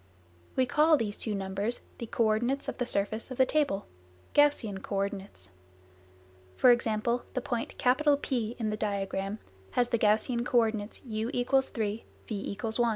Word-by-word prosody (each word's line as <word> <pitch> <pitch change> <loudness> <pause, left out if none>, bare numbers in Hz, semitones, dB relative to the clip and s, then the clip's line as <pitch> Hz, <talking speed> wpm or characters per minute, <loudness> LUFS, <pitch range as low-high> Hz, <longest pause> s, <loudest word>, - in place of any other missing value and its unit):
We 260 - +3
call 305 +4 +4
these 210 -5 -2
two 215 -2 -2
numbers 195 +4 -2 0.2
the 235 - -5
co 230 - +1
ordinates 240 +6 +1
of - - -4
the 245 - 0
surface 210 +4 -1
of 255 - -6
the 260 - +6
table 275 -10 +1 0.5
(Gaussian 260 -10 +3
co 200 - -5
ordinates). 195 - -4 1.0
For 250 - +6
example, 235 0 +1
the - - +2
point 240 -2 -3 0.5
P 240 -3 -1
in 220 -3 -1
the 210 - -2
diagram 200 -1 -2 0.4
has 245 -1 +2
the 235 - +1
Gaussian 220 +3 +2
co 245 0 +1
ordinates 220 -2 0
u= 220 -1 -2
3, 245 -4 0 0.2
v= 200 -2 -4
1. 235 +1 +1
225 Hz, 160 wpm, -29 LUFS, 205-245 Hz, 1.0 s, the